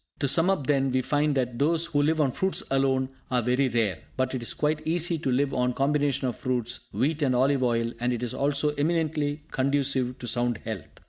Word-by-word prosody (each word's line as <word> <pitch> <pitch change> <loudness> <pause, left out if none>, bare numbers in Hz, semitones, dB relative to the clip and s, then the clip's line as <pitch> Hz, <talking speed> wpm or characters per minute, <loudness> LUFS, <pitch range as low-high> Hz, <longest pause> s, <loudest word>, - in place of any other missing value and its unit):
To 140 - 0
sum 165 +6 +3
up, 190 -8 0
then, 135 -1 +2
we 130 0 +1
find 145 +2 +1
that 125 -3 -1
those 165 +3 +3
who 145 -3 0
live 155 +2 +1
on 140 -4 +2
fruits 190 +8 0
alone 135 -1 +1 0.2
are 125 -2 +1
very 125 +3 +2
rare, 110 -7 0 0.2
but 130 0 0
it 130 - -3
is 120 - -2
quite 155 0 0
easy 170 0 +1
to 140 - -2
live 135 +2 +1
on 125 0 +1
a - - -2
combination 140 -1 +1
of 125 - -3
fruits, 125 -1 -2
wheat 155 +4 -1
and 130 -3 +2
olive 135 +2 +2
oil, 115 -2 +1
and 120 +1 0
it 120 0 -3
is 120 - -3
also 145 +1 +1
eminently 155 -2 0
conducive 135 -2 0
to 120 - -7
sound 120 -1 0
health. 110 -7 -5
135 Hz, 220 wpm, -26 LUFS, 125-150 Hz, 0.2 s, sum